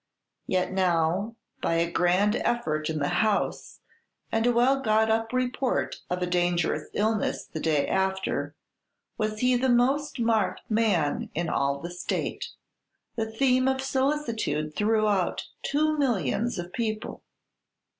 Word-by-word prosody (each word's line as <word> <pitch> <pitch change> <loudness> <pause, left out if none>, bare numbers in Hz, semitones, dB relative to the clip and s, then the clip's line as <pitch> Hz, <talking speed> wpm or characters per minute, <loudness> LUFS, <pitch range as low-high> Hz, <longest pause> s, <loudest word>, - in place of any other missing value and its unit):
Yet 185 -1 0
now, 185 +3 +1 0.3
by 165 - +1
a 170 +1 +1
grand 185 +5 +2
effort 155 -10 -1
in 160 - -2
the 145 -1 0
"House," 215 -2 -1 0.5
and 225 +1 +1
a - - +5
well 250 +3 +3
got 220 -2 +3
up 225 0 0
report 255 0 -1
of 180 0 -1
a - - +2
dangerous 175 -3 0
illness 215 0 0
the 160 - -7
day 155 -3 +1
after, 190 0 -1 0.6
was 215 0 -1
he 250 0 +4
the 260 +2 +1
most 270 +5 +2
marked 225 -4 +1
man 205 -9 +1
in 170 +1 -1
all 140 0 0
the 170 +4 -6
state, 175 0 -3 0.7
the 220 -2 -2
theme 255 +2 +2
of 265 0 +1
solicitude 255 - -1
throughout 210 -3 +1 0.2
two 310 +2 +1
millions 230 - 0
of 175 0 -6
people! 215 -2 -3
215 Hz, 135 wpm, -27 LUFS, 175-240 Hz, 0.7 s, a